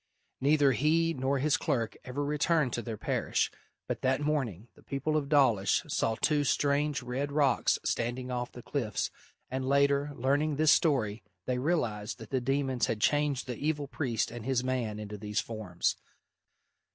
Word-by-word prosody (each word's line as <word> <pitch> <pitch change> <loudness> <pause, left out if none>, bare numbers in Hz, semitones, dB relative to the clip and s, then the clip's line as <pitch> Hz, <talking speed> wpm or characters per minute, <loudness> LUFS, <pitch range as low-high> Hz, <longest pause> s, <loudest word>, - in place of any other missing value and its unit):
Neither 145 0 +4
he 160 +5 +2
nor 135 0 0
his 145 +2 +2
clerk 120 -7 -1
ever 140 +3 -3
returned 150 -2 +1
to 120 - -1
their 115 -2 -5
parish, - - 0 0.4
but - - -3
that 130 +1 +2
morning 130 - -1
the - - -20
people 140 +3 -2
of 145 -2 0
Dawlish 130 -10 +3
saw 110 - 0
two 150 +4 +2
strange 145 +2 +1
red 135 +4 -3
rocks 145 -2 +3
standing 125 +2 -1
off 125 -1 -3
the 120 - -11
cliffs, 115 -9 -2 0.4
and 130 0 -2
later, 140 +1 +2
learning 145 +4 +1
this 155 +1 +4
story, 120 -9 +2 0.2
they 125 -1 -1
realised 120 -9 -1
that 110 -2 -11
the 130 -2 +1
demons 135 -1 0
had 110 - -2
changed 145 +2 +1
the 125 -3 -5
evil 150 -1 -1
priest 125 -7 -1
and 120 -1 -7
his 130 0 0
man 125 -5 -1
into 105 -1 -7
these 105 +1 -2
forms. 105 -6 -2
135 Hz, 165 wpm, -30 LUFS, 120-145 Hz, 0.4 s, Neither